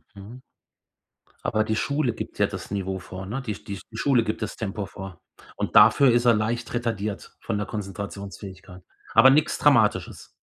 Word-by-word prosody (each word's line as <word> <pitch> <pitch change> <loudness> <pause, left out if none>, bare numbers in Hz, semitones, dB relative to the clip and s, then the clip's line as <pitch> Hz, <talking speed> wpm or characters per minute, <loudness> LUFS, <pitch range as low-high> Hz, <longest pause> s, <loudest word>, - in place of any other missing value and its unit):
Mhm. 110 +6 -11 1.0
Aber 110 0 +1
die 110 0 -1
Schule 135 +1 0
gibt - - -7
ja - - +4
das - - -8
Niveau 95 -1 -2
vor, 95 +1 -8
ne? 120 +6 -3
Die 110 -4 -3
Sch - - -13
die 100 -1 -6
die 110 - -9
Schule 125 -4 +3
gibt 110 +1 -3
das 105 - -4
Tempo 100 -2 -4
vor. 95 -2 -10 0.3
Und - - -4
dafür 115 +6 +7
ist 120 +1 +2
er 120 - +6
leicht 115 +3 -2
retardiert 110 -4 -3
von 105 - -3
der 105 - -3
Konzentrationsfähigkeit, 100 -2 -7 0.3
aber 135 - +8
nix 150 +3 +2
Dramatisches. 115 -8 +2
105 Hz, 180 wpm, -25 LUFS, 100-120 Hz, 1.0 s, aber